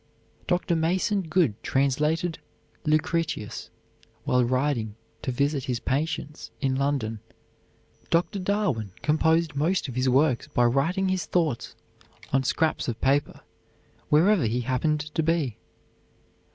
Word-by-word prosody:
Dr. 175 Hz, -1 st, +1 dB
Mason 180 Hz, +5 st, +1 dB
Good 160 Hz, -, +1 dB
translated 150 Hz, +6 st, 0 dB, 0.5 s
"Lucretius" 155 Hz, -6 st, -1 dB, 0.5 s
while 125 Hz, 0 st, +2 dB
riding 125 Hz, -4 st, 0 dB, 0.3 s
to 130 Hz, -, -2 dB
visit 140 Hz, +2 st, 0 dB
his 125 Hz, -4 st, -1 dB
patients 150 Hz, +3 st, -3 dB
in 135 Hz, -2 st, 0 dB
London. 130 Hz, -5 st, -1 dB, 0.9 s
Dr. 175 Hz, +4 st, +1 dB
Darwin 180 Hz, -, -1 dB
composed 160 Hz, +1 st, +2 dB
most 160 Hz, +5 st, 0 dB
of 130 Hz, -, -6 dB
his 130 Hz, +1 st, +1 dB
works 130 Hz, -1 st, +2 dB
by 120 Hz, -, +1 dB
writing 165 Hz, +10 st, +1 dB
his 185 Hz, -2 st, -1 dB
thoughts 160 Hz, -9 st, -1 dB, 0.6 s
on 135 Hz, -, +4 dB
scraps 160 Hz, +4 st, 0 dB
of 120 Hz, -2 st, -3 dB
paper 140 Hz, +2 st, +1 dB, 0.7 s
wherever 170 Hz, -, +4 dB
he 120 Hz, +3 st, 0 dB
happened 130 Hz, +5 st, 0 dB
to -, -, +1 dB
be. 155 Hz, -7 st, 0 dB
150 Hz, 120 wpm, -26 LUFS, 130-165 Hz, 0.9 s, on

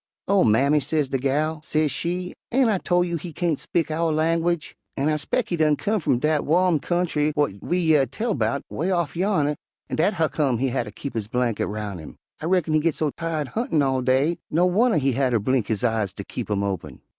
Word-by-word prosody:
"'Oh, 200 Hz, 0 st, +4 dB
mammy,' 135 Hz, +7 st, +4 dB
sez 145 Hz, 0 st, 0 dB
de 135 Hz, -, -1 dB
gal, 150 Hz, +4 st, 0 dB
sez 155 Hz, -1 st, +1 dB
she, 180 Hz, +5 st, -3 dB, 0.2 s
'ain' 255 Hz, -1 st, +3 dB
I 200 Hz, -4 st, +1 dB
tol' 175 Hz, 0 st, +2 dB
you 170 Hz, -1 st, -2 dB
he 170 Hz, +2 st, -7 dB
kain't 165 Hz, -1 st, -1 dB
speak 165 Hz, -2 st, -1 dB
ow' 165 Hz, +1 st, 0 dB
langwidge, 165 Hz, +1 st, 0 dB, 0.2 s
an' 140 Hz, +3 st, +1 dB
I 155 Hz, -, +2 dB
'spec' 175 Hz, +10 st, -1 dB
he 175 Hz, -, 0 dB
done 155 Hz, -2 st, +3 dB
come 215 Hz, +5 st, -1 dB
f'um 130 Hz, -, +2 dB
dat 150 Hz, +1 st, +1 dB
wo'm 175 Hz, 0 st, +3 dB
kyountry 160 Hz, -3 st, 0 dB
whar 145 Hz, -1 st, +2 dB
we 175 Hz, -, -1 dB
year 155 Hz, -6 st, +3 dB
tell 215 Hz, -, -2 dB
'bout, 140 Hz, -6 st, -1 dB
'way 170 Hz, +5 st, -2 dB
off 170 Hz, -5 st, 0 dB
yonner, 170 Hz, -6 st, +1 dB, 0.4 s
an' -, -, -2 dB
dat 185 Hz, +6 st, +2 dB
huccome 155 Hz, -6 st, +1 dB
he 135 Hz, +3 st, 0 dB
hatter 120 Hz, -3 st, -2 dB
keep 135 Hz, +6 st, -7 dB
his 110 Hz, -3 st, -3 dB
blankit 120 Hz, -1 st, 0 dB
roun' 105 Hz, -3 st, -5 dB
him. 80 Hz, -, -10 dB, 0.3 s
I -, -, -4 dB
reckon 175 Hz, -3 st, +1 dB
he 155 Hz, -, +4 dB
git 160 Hz, 0 st, 0 dB
so 155 Hz, -2 st, 0 dB
tired 160 Hz, -3 st, -3 dB
huntin' 170 Hz, -10 st, 0 dB
all 130 Hz, -1 st, +1 dB
day, 135 Hz, +6 st, +2 dB
no 170 Hz, +4 st, +2 dB
wunner 210 Hz, +3 st, +3 dB
he 135 Hz, -2 st, +2 dB
hatter 125 Hz, -1 st, +1 dB
blink 120 Hz, 0 st, 0 dB
his 110 Hz, +1 st, -2 dB
eyes 110 Hz, -4 st, 0 dB
ter -, -, -7 dB
keep -, -, -5 dB
'em 100 Hz, -1 st, 0 dB
open.' 85 Hz, -9 st, -4 dB
155 Hz, 225 wpm, -24 LUFS, 130-175 Hz, 0.4 s, Oh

